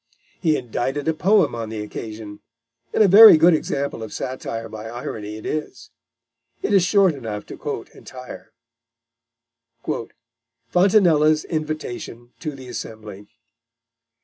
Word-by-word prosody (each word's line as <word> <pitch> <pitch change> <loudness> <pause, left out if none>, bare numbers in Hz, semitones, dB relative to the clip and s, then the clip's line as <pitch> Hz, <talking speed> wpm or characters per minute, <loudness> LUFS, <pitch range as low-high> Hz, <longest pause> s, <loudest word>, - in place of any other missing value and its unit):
He 160 -4 +2
indited 130 +4 -3
a 160 - +2
poem 190 - +3
on 115 -2 -5
the 110 -1 -5
occasion, 105 -1 -8 0.5
and - - +4
a - - +5
very 210 -1 +10
good 165 +3 +5
example 140 -5 -2
of 110 - -7
satire 115 -3 -5
by 110 0 -8
irony 115 -4 -6
it 110 - -11
is. 155 0 -5 0.7
It 205 - 0
is 195 -3 +5
short 190 -1 +3
enough 110 -7 -6
to - - -9
quote - - -6
entire: 125 -1 -11 2.2
FRONTINELLA'S 170 -5 +4
INVITATION 155 -7 -5
TO 155 - -4
THE 130 -2 -11
ASSEMBLY. 110 -4 -8
135 Hz, 125 wpm, -22 LUFS, 110-160 Hz, 2.2 s, very